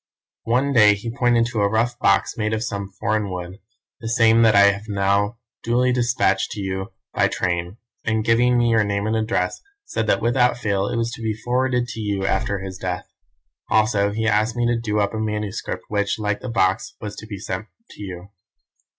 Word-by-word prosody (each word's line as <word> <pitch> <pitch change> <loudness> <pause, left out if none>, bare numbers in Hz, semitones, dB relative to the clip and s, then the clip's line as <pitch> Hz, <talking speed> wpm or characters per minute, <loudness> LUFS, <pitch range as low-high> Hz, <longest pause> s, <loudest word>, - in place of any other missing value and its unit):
"One 130 +5 +1
day 105 -4 +6
he 115 +3 -6
pointed 120 -3 +3
to 110 - -1
a 100 - +3
rough 120 +3 0
box 100 0 +2
made 110 -1 -1
of 110 - -3
some 100 -3 -4
foreign 105 -1 0
wood 90 +1 -6 0.4
(the 115 -2 -5
same 115 0 +4
that 110 -2 +5
I 100 0 +7
have 100 +2 -8
now 100 +2 +1 0.2
duly 125 +2 +2
despatched 120 -6 +1
to 105 - -7
you 95 +1 -4 0.2
by - - +3
train), 90 +2 -2 0.3
and, 110 -1 0
giving 120 +2 +3
me 120 -1 +3
your 110 -1 +4
name 100 0 -1
and 110 +1 0
address, 110 -5 -1 0.2
said 110 - -2
that 100 - +3
without 120 +2 +2
fail 100 -4 0
it 120 - -2
was 115 0 -1
to 115 - -8
be 110 -1 -1
forwarded 125 +2 0
to 115 0 -6
you 100 -2 -2
after 100 +1 0
his 95 -1 -7
death. 90 -1 -3 0.6
Also 105 -2 +3
he 110 +2 -2
asked 110 +2 +2
me 120 0 0
to 120 0 +2
do 105 -2 -1
up 100 +1 0
a 110 - -3
manuscript, 105 -2 -3
which, 100 -1 0
like 105 -1 -1
the 130 - -6
box, 95 -5 0
was 105 -1 -6
to 110 - -9
be 105 -2 -6
sent 95 +2 -5 0.2
to - - -13
you. 95 -1 -7
110 Hz, 205 wpm, -22 LUFS, 100-115 Hz, 0.6 s, I